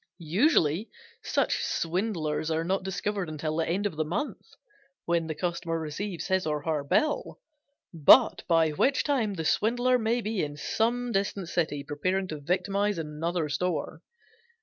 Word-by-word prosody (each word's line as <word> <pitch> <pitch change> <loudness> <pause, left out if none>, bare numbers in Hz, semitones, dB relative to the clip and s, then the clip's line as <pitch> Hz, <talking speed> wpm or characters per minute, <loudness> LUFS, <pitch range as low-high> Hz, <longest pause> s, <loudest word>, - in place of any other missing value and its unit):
Usually 200 - +3 0.3
such - - 0
swindlers 165 -4 -1
are 160 0 0
not 190 +3 0
discovered 195 -1 -3
until 155 0 -3
the 165 - 0
end 195 +4 0
of 160 -6 -3
a - - +3
month, 190 - -4 0.5
when 170 -1 +1
the 155 - -3
customer 170 -1 -2
receives 165 +4 -4
his 190 -3 0
or 150 -1 -1
her 155 -2 -1
bill, 295 - 0 0.5
but 155 -3 +6
by 165 -2 +3
which 260 - +2
time 235 -9 0
the 160 -3 -4
swindler 245 +7 +2
may 230 +2 +1
be 215 -3 -2
in 145 0 -5
some 240 +8 0
distant 195 -3 -1
city 155 -5 -1
preparing 185 +7 -1
to 155 - -5
victimize 195 +6 0
another 160 +1 -2
store. 180 +5 -2
175 Hz, 150 wpm, -28 LUFS, 155-205 Hz, 0.5 s, but